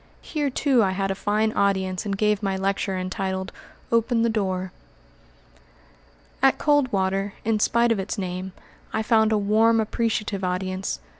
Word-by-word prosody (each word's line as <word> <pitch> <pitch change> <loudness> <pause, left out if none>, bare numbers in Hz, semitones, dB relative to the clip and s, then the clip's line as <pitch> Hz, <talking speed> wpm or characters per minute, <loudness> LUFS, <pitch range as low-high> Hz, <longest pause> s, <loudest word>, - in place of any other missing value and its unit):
Here, 295 -3 -2
too, 265 -1 +2
I 190 -3 +2
had 195 0 -1
a - - +1
fine 215 +2 0
audience 190 -1 0
and 200 -1 -2
gave 210 0 +1
my 195 -2 -1
lecture 195 0 -1
entitled 190 +1 -3 0.4
"Open 230 0 +2
the 230 - +2
Door." 190 -4 -2 1.7
At 270 0 +4
Coldwater, 200 -9 +1
in 220 -1 +1
spite 235 +2 +3
of 225 - +1
its 195 +4 -4
name, 185 -1 -4 0.4
I 220 - 0
found 220 -1 +3
a 215 - +3
warm, 220 +3 +3
appreciative 215 -3 -1
audience. 185 +1 -2
205 Hz, 150 wpm, -24 LUFS, 190-225 Hz, 1.7 s, At